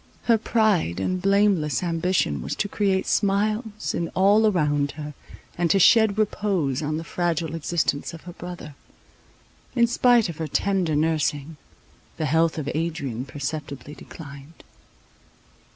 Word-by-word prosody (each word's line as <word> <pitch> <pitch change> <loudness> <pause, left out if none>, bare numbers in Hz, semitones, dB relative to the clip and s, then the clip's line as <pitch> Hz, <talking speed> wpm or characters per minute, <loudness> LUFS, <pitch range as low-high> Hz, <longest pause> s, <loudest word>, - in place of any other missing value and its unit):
Her 230 -2 +3
pride 210 - +1
and 185 - -1
blameless 195 -7 +2
ambition 165 - 0
was 65 - -4
to - - -1
create 195 -2 0
smiles 210 +2 0
in 170 - -2
all 205 +4 +4
around 145 -7 +1
her, 150 0 -7 0.5
and 175 -1 +2
to 195 - +4
shed 215 +2 +5
repose 195 -10 0
on 155 0 -2
the 165 - -5
fragile 165 -2 -2
existence 165 -2 -1
of 165 -2 -10
her 175 - -9
brother. 175 -4 -8 1.0
In 235 -2 +5
spite 240 -1 +3
of 170 -3 -7
her 160 - -3
tender 185 -3 0
nursing, 155 -1 0 0.6
the 155 - -1
health 160 +3 +2
of 150 -3 -4
Adrian 150 -7 -3
perceptibly 145 0 -6
declined. 145 0 -12
165 Hz, 135 wpm, -24 LUFS, 150-200 Hz, 1.0 s, shed